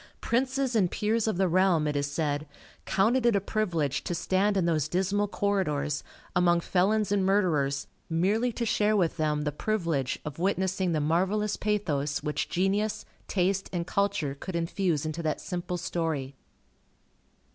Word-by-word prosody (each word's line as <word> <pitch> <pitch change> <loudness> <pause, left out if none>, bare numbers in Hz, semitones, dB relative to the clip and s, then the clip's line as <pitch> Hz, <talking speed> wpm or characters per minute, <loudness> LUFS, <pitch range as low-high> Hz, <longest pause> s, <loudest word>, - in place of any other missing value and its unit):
Princes 260 +1 0
and 190 -5 +3
peers 220 +3 0
of 215 - 0
the 190 0 +3
realm, 180 -2 +3
it 150 -1 -1
is 140 0 0
said, 145 0 -1 0.4
counted 230 +6 +2
it 235 -3 +4
a - - +4
privilege 175 - -1
to 175 - -2
stand 195 +4 +1
in 185 - +2
those 155 -4 +1
dismal 195 +4 0
corridors, 180 -9 -1 0.3
among 175 -1 +4
felons 200 +4 +1
and 200 -2 +2
murderers, 155 -8 +1 0.2
merely 200 +9 +1
to 235 +1 -3
share 215 -1 +2
with 175 -4 +1
them 150 -1 0
the 150 - -1
privilege 165 - -1
of 150 +1 -6
witnessing 190 0 0
the 155 - +1
marvellous 190 +7 +1
pathos 150 -10 -1
which 150 -1 -2
genius, 200 +4 0 0.2
taste, 195 +1 0
and 175 -2 -2
culture 200 -7 0
could 170 +6 -7
infuse 170 -2 0
into 155 +2 -3
that 155 -2 -1
simple 180 0 -4
story. 165 -6 -2
180 Hz, 155 wpm, -28 LUFS, 155-205 Hz, 0.4 s, it